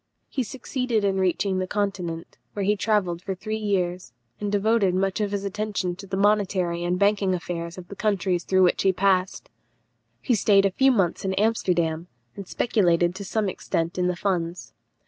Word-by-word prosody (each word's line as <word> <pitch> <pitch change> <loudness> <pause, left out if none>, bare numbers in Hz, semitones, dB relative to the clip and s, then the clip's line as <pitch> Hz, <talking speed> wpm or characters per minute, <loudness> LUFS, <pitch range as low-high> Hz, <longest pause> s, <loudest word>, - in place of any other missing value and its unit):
He 270 - -2
succeeded 250 -2 -2
in 195 -1 +1
reaching 190 +1 +1
the 185 - -2
Continent, 180 -5 -3
where 200 -2 -2
he 210 +2 +3
travelled 195 -5 0
for 190 +1 -4
three 215 +4 -4
years, 185 - -1 0.3
and 205 -1 -2
devoted 205 -2 +2
much 195 +2 0
of 205 - 0
his 200 -1 -2
attention 200 -3 -2
to 195 0 -10
the 190 0 -3
monetary 190 -4 +1
and 175 +1 0
banking 200 -1 +2
affairs 170 +1 -5
of 180 -1 -9
the 200 - -9
countries 195 -5 0
through 190 0 +3
which 180 - +3
he 190 -1 +3
passed. 185 0 0 0.7
He 255 - 0
stayed 200 -2 +4
a 195 - +2
few 265 +7 +4
months 190 -8 +1
in 190 -1 -1
Amsterdam, 175 -6 0 0.3
and 200 -2 -8
speculated 175 -7 +2
to 195 +2 -7
some 210 +2 -1
extent 170 -1 -2
in 180 - +2
the 180 - 0
funds. 175 -2 -2
190 Hz, 185 wpm, -25 LUFS, 180-205 Hz, 0.7 s, stayed